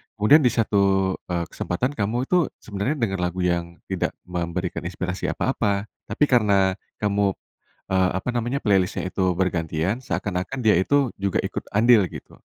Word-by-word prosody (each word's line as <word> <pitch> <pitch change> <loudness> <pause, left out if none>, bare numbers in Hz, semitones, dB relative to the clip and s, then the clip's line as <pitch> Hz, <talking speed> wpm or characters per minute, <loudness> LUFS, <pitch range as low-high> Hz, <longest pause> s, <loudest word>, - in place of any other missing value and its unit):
kemudian 110 +9 +6
di 135 - +3
satu, 100 -4 +2
eee, 85 -1 -1
kesempatan 125 +10 -2
kamu 120 -1 -1
itu 175 -5 +3 0.2
sebenernya 105 +8 -2
dengar 105 -8 -1
lagu 90 +1 -3
yang 85 -1 -1 0.2
tidak 95 - -1
memberikan 90 0 -3
inspirasi 95 +1 -3
apa-apa, 105 -5 -1 0.2
tapi - - 0
karena 100 -6 +4 0.3
kamu, 100 -1 +1 0.5
eee, 95 -1 +2
apa 95 +6 -4
namanya 120 +4 -1
playlist-nya 95 -2 +1
itu 95 -1 0
bergantian 90 +4 -1
seakan-akan 95 +7 -3
dia 110 -3 +4
itu 135 +9 +2
juga 100 -1 0
ikut - - -4
andil, 110 0 +5
gitu. - - -11
100 Hz, 150 wpm, -23 LUFS, 90-115 Hz, 0.5 s, kemudian